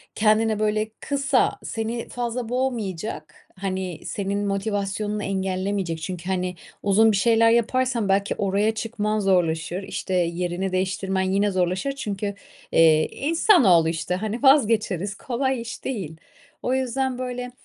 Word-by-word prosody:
Kendine, 215 0 +3
böyle, 215 0 0
kısa, 280 -2 +1
seni 230 +1 -4
fazla 240 -1 -3
boğmayacak, 230 -7 -3 0.2
hani, 185 -3 -3
senin 200 0 -2
motivasyonunu 205 +1 -2
engellemeyecek, 190 -3 -2
çünkü, 180 0 -5
hani, 180 -1 -1 0.3
uzun 215 +3 +5
bir 205 - +1
şeyler 230 +3 +4
yaparsan 235 -1 +1
belki 200 +1 +1
oraya 205 +2 +1
çıkman 215 -1 -1
zorlaşır, 180 -2 +1
işte, 190 - -4
yerini 175 +2 -1
değiştirmen 190 +1 -1
yine 195 +2 +1
zorlaşır. 185 +7 0
Çünkü, 205 -5 -4 0.4
iii, 160 -1 +5
insanoğlu, 275 - +4
işte, 165 +2 -2
hani, 215 +7 -4
vazgeçeriz, 215 - +3
kolay 260 +2 -1
iş 230 0 -8
değil. 185 - -4 0.5
O 250 - 0
yüzden, 260 0 -1
böyle, 250 -1 -4
205 Hz, 125 wpm, -24 LUFS, 185-235 Hz, 0.5 s, uzun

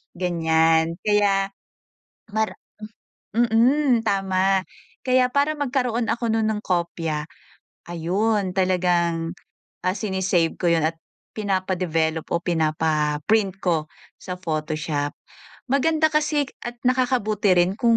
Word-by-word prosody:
ganyan. 165 -2 +2
Kaya, 200 -2 +2 0.8
mar 220 0 0 0.8
mm, 240 +3 +3
tama. 195 -1 +2 0.4
Kaya 255 -1 +3
para 285 +2 +2
magkaroon 250 -4 -1
ako 235 0 -2
nun 225 -1 +1
ng 210 - -3
kopya, 170 -4 -1 0.7
ayun 190 +4 0
talagang, 175 -3 +1 0.6
ah, 185 - +2
sine-save 190 -4 0
ko 180 - -1
yun 165 -1 +2
at 160 0 -3 0.4
pinapa-develop 185 -6 -1
o 170 - +1
pinapa-print 160 +4 +1
ko 165 -4 +1 0.3
sa 180 - -6
photoshop. 155 -3 -2 0.6
Maganda 315 +3 +3
kasi 300 -1 +2 0.2
at 240 0 -5
nakakabuti 245 -5 +1
rin 175 +1 +3
kung 230 -1 +4
190 Hz, 105 wpm, -23 LUFS, 165-230 Hz, 0.8 s, kung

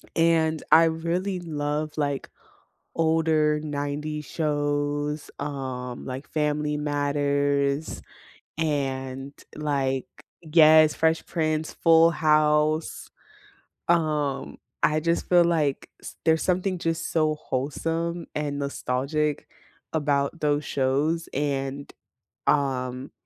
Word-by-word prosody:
and 160 -1 +2
I 165 - +8
really 170 +4 -1
love, 150 -2 -3
like, 145 -2 -2 0.7
older 160 -2 +2
90s 150 0 -4
shows, 145 -1 -1
um, 130 -4 -5
like 130 +2 -6
Family 150 -1 -1
Matters, 145 0 0 0.6
and, 135 -3 -2 0.2
like 135 -3 -1 0.4
Yes, 155 -1 +6
Fresh 160 0 +1
Prince, 155 -2 -1
Full 165 0 +5
House, 155 0 +2 0.8
um, 150 - 0 0.2
I 155 0 +3
just 170 +2 -1
feel 175 -1 +6
like 155 -5 0
s - - -9
there's 160 0 +3
something 185 +1 0
just 165 -1 -2
so 155 -2 +2
wholesome 165 +5 -3
and 145 -1 -2
nostalgic 140 +2 -2 0.5
about 145 0 0
those 150 0 +1
shows, 145 +6 0
and 140 0 -2 0.6
um, 130 -2 0
150 Hz, 95 wpm, -25 LUFS, 140-160 Hz, 0.8 s, I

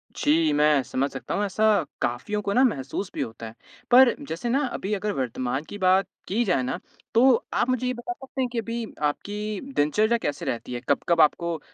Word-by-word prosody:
जी, 155 +1 +2
मैं 150 -1 +4
समझ 135 +2 -1
सकता - - -5
हूँ 205 - 0
ऐसा 205 +2 -2 0.4
काफ़ियों 205 +13 -1
को 200 0 -2
ना 255 - +5
महसूस 185 - -1
भी - - -2
होता 115 0 -5
है। 110 - -10 0.4
पर 255 0 +8
जैसे 170 +9 -3
ना 270 +4 +2
अभी 205 +3 -3
अगर 210 +1 -1
वर्तमान 130 +2 -2
की 205 - -6
बात 190 0 +3 0.2
की 225 +6 +1
जाए 155 -9 +1
ना 150 +8 -3 0.3
तो 235 +3 +5 0.3
आप 255 - +1
मुझे 255 0 0
ये 255 - 0
बता 240 +10 -5
सकते 265 -4 -6
हैं 255 - +1
कि - - -3
अभी 230 +1 -3 0.2
आपकी 205 +7 -2 0.2
दिनचर्या 215 +11 +2
कैसे 145 -9 -3
रहती 120 +1 -3
है? 120 - -4
कब-कब 170 -2 +3
आपको 170 +1 +2
195 Hz, 205 wpm, -25 LUFS, 145-230 Hz, 0.4 s, पर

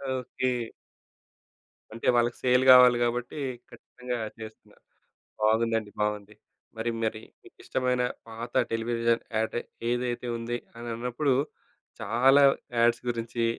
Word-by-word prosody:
Okay. 130 0 -2 1.4
అంటే 115 - -5
వాళ్ళకి 120 0 +1
sale 125 0 +4
కావాలి 125 -1 +8
కాబట్టి 120 +4 -2 0.3
ఖచ్చితంగా 125 -1 -7 0.2
చేస్తున్నారు. 110 0 -12 0.6
బాగుందండి. 110 -1 +1
బావుంది. 105 0 -2 0.4
మరి 115 +1 -2
మరి 110 -1 -1 0.2
మీకిష్టమైన 125 -1 -2 0.3
పాత 115 +2 -7 0.2
టెలివిజన్ 115 0 0 0.2
యాడ్ 110 +1 -1 0.3
ఏదైతే 120 0 -2
ఉంది 120 +1 -3 0.2
అనన్నప్పుడు 120 +4 -2 0.7
చాలా 125 +6 +4 0.4
యాడ్స్ 120 0 +3
గురించి 115 0 -2
120 Hz, 95 wpm, -27 LUFS, 115-125 Hz, 1.4 s, కావాలి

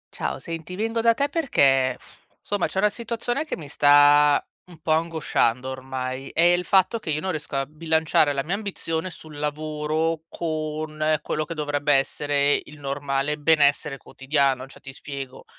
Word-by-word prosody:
Ciao, - - -3
senti, 165 0 -7
vengo 225 +3 -1
da 230 0 +4
te 280 +4 +1
perché, 135 - +2 0.4
somma, 205 -3 -1
c'è - - -8
una 210 +2 +4
situazione 240 +5 -3
che - - -4
mi 155 - -9
sta 145 0 +5 0.3
m 180 - -18
un 160 - -16
po' 160 - -2
angosciando 155 -6 +1
ormai: 130 0 -5
è - - +1
il 175 +1 +4
fatto 190 +4 +3
che 190 - -8
io 155 0 0
non 190 +3 -2
riesco 155 -3 -5
a 135 0 0
bilanciare 155 0 +1
la 140 -1 -1
mia 170 +6 -3
ambizione 185 -5 -3
sul 155 -4 -11
lavoro 155 +2 -2
con 155 -1 -2
quello 155 - -2
che 165 - -6
dovrebbe 145 -1 0
essere 145 +1 +1
il 150 - -13
normale 140 +1 -2
benessere 145 -2 +3
quotidiano. 135 -1 -1
Cioè, 135 - -16
ti 135 - -10
spiego: 135 -2 -8
150 Hz, 170 wpm, -24 LUFS, 140-165 Hz, 0.4 s, sta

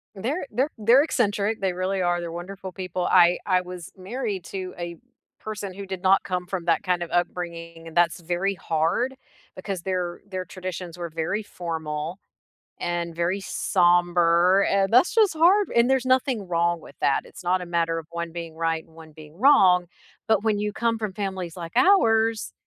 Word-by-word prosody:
They're 265 - -3
they're 260 +7 +1
they're 235 +6 +5
eccentric, 215 -6 0
they 190 -2 0
really 185 +1 -1
are, 175 0 +1
they're 170 -1 -5
wonderful 185 +3 -7
people. 185 -1 -4
I 175 -1 +5
I 185 -2 +2
was 180 -2 -9
married 200 -1 -4
to 185 -1 -6
a 170 -1 -5 0.4
person 210 -3 -6
who 200 +1 -7
did 190 -1 -6
not 190 0 +4
come 180 -1 -3
from 180 -2 -4
that 170 +3 +2
kind 180 -2 0
of 170 - -8
upbringing, 170 -1 -3
and 165 - -11
that's 170 -1 +3
very 175 +4 -1
hard 170 +11 0 0.4
because 185 -1 -5
their 180 -1 -3
their 185 -1 -4
traditions 180 -1 -7
were 170 -1 -5
very 165 +7 -2
formal 160 -2 -5 0.6
and 175 -1 -3
very 175 +4 0
somber, 175 0 +3
and 195 0 +2
that's 250 +9 +5
just 435 -4 +4
hard 370 +6 +4
and 235 +1 +4
there's 265 -1 +2
nothing 255 -5 +1
wrong 170 0 +1
with - - -14
that, 135 - +2
it's - - -13
not 180 +1 +1
a - - -6
matter 165 -1 0
of 160 - -8
one 170 0 -5
being 165 -1 -7
right 165 0 -1
and 160 - -23
one 160 -1 -13
being 150 0 -14
wrong, 190 -9 +5 0.4
but 220 -3 +3
when 215 -2 +2
you 210 0 -2
come 230 0 0
from 215 -3 -3
families 190 -4 -4
like 165 -2 -7
ours 225 - +3
185 Hz, 185 wpm, -24 LUFS, 170-205 Hz, 0.6 s, they're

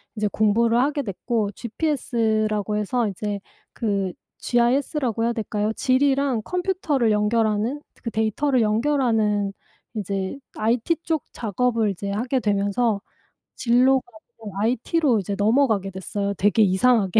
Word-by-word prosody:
이제 210 -1 0
공부를 230 +2 +2
하게 285 +3 +1
됐고 215 0 -2
GPS라고 220 - -1
해서 225 +3 0
이제 205 +1 -3 0.3
그 200 -5 -1 0.3
GIS라고 245 -1 +1
해야 235 - +1
될까요? 215 -2 -2
지리랑 270 -1 +2
컴퓨터를 355 - 0
연결하는 215 +4 +1 0.2
그 230 - -3
데이터를 230 +4 +1
연결하는 220 -4 +1 0.4
이제 195 +2 -3 0.2
IT 235 +9 +1
쪽 320 -4 -1
작업을 230 0 0
이제 200 +1 -4
하게 245 +6 0
되면서 205 0 +1 0.5
진로가 255 +2 +3 0.3
좀 210 -4 -9
IT로 245 +5 +1
이제 200 +1 -3
넘어가게 220 -2 +2
됐어요, 200 +2 -3
되게 205 +3 +2
이상하게. 205 0 +3
225 Hz, 300 characters per minute, -23 LUFS, 205-255 Hz, 0.5 s, 진로가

